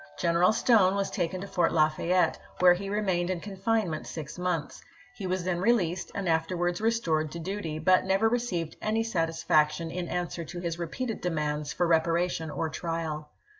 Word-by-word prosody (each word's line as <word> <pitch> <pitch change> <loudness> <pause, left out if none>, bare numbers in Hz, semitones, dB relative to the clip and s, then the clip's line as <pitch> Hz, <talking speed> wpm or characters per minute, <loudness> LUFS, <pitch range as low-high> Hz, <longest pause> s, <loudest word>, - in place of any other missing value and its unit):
General 170 +2 +3
Stone 215 -4 +4
was 200 -1 -1
taken 180 -1 -2
to 200 - -6
Fort 175 -4 +1
Lafayette, 165 +3 +2 0.2
where 180 -1 +7
he 195 +2 -5
remained 190 -4 0
in 185 -2 -1
confinement 195 -3 -1
six 155 +2 -7
months; 180 -4 -2 0.3
he 205 -6 -5
was 185 0 -1
then 180 -1 -1
released 185 -5 +1
and 200 -2 -2
afterwards 175 +2 0
restored 170 -10 +1
to - - -6
duty, 170 -2 -4
but 185 +4 +4
never 195 +3 +2
received 215 -9 -1
any 220 +1 +1
satisfaction 165 -4 +1
in 175 0 -3
answer 175 -1 -3
to 175 +2 -7
his 170 -1 -3
repeated 225 +8 -4
demands 150 -4 -2
for 175 - 0
reparation 165 0 +1
or 160 - -2
trial. 160 -2 -4
175 Hz, 170 wpm, -28 LUFS, 165-195 Hz, 0.3 s, where